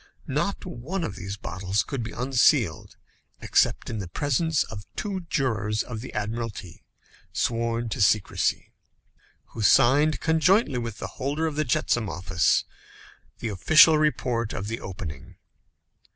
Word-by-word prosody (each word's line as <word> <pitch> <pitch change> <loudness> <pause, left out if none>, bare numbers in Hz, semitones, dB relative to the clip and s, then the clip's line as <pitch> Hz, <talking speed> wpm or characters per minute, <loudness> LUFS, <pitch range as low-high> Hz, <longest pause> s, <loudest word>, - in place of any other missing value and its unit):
Not - - -2
one 165 +10 -4
of 105 - -4
these 100 +1 -6
bottles 95 +1 -2
could 135 -4 -4
be 110 -1 -5
unsealed 125 - +1 0.4
except - - +1
in 110 - -4
the 95 - -5
presence 145 - 0
of 105 -2 -9
two 190 -5 -4
jurors 110 - 0
of 115 -3 -7
the 130 - -8
Admiralty 105 -4 -5 0.5
sworn 115 0 -1
to - - -3
secrecy, 100 0 +1 0.8
who 115 - -7
signed, 140 +8 +4
conjointly 160 - +2
with 115 -3 -5
the - - -5 0.2
holder 145 +5 -1
of 155 -2 -2
the 155 +1 0
jetsam 120 -3 0
office, 90 +1 +1 0.7
the 115 - -4
official 155 - +6
report 125 -7 0
of 100 +2 -4
the 115 - -3
opening. 90 - -8
115 Hz, 135 wpm, -25 LUFS, 105-145 Hz, 0.8 s, official